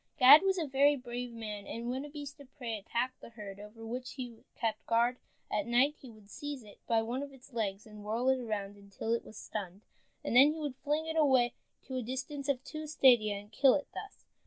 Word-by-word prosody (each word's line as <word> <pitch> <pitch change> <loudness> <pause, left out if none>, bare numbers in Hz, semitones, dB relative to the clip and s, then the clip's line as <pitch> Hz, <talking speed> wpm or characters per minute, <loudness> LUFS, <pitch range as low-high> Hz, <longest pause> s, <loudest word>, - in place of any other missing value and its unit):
Gad 285 +2 +10
was 385 0 +2
a 335 - 0
very 280 +1 +4
brave 245 -2 -5
man, 210 -3 -6
and 235 +1 -4
when 260 +2 -3
a - - -9
beast 290 -1 -8
of 275 -2 -14
prey 235 -5 -3
attacked 235 +5 -3
the - - -10
herd, 205 -4 -9
over 215 +2 -10
which 250 +3 -5
he 245 -4 -7
kept 220 -2 -2
guard 235 +2 +3 0.3
at 205 +1 0
night, 250 +5 +4
he 260 - -10
would 215 -3 -16
seize 290 -4 -6
it 205 -1 -15
by 225 -1 +3
one 240 +4 -2
of 285 0 -6
its 265 0 -17
legs, 205 -3 -2
and 210 -1 -11
whirl 225 +4 -1
it 265 0 +3
around 205 -4 -4
until 200 +3 -4
it 235 - 0
was 215 - -12
stunned, 195 -2 -6 0.4
and - - -2
then 280 +4 +8
he 320 - -7
would 295 -4 -3
fling 300 +3 -1
it 320 0 -3
away 265 -6 +4 0.3
to 260 -2 -5
a - - -1
distance 265 +4 -4
of 265 -2 0
two 310 +1 -6
stadia, 240 -8 +5
and 205 +1 -9
kill 270 -2 +5
it 285 - -3
thus. 405 - -9
245 Hz, 230 wpm, -32 LUFS, 220-280 Hz, 0.4 s, Gad